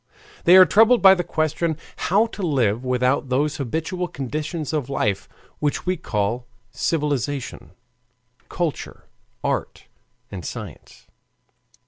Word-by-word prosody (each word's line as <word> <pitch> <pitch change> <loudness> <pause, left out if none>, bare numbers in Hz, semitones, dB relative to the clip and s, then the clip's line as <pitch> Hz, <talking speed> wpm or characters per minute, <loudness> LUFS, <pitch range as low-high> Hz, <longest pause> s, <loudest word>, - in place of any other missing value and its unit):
They 180 +2 +8
are 185 - +10
troubled 225 +5 +5
by 190 -1 +10
the 180 -2 -1
question 155 0 -1 0.3
how 205 +5 +4
to 225 -2 -8
live 125 - +1
without 125 +2 +1
those 145 +4 0
habitual 160 +7 -3
conditions 155 +1 -4
of 145 -4 -2
life 105 -7 -1 0.3
which 145 -1 -1
we 185 0 +1
call 120 - -2 0.2
civilization, 140 - -2 0.8
culture, 170 -4 -4 0.4
art, - - -2 0.5
and 90 -3 -6
science. - - -9
150 Hz, 115 wpm, -22 LUFS, 125-175 Hz, 0.8 s, are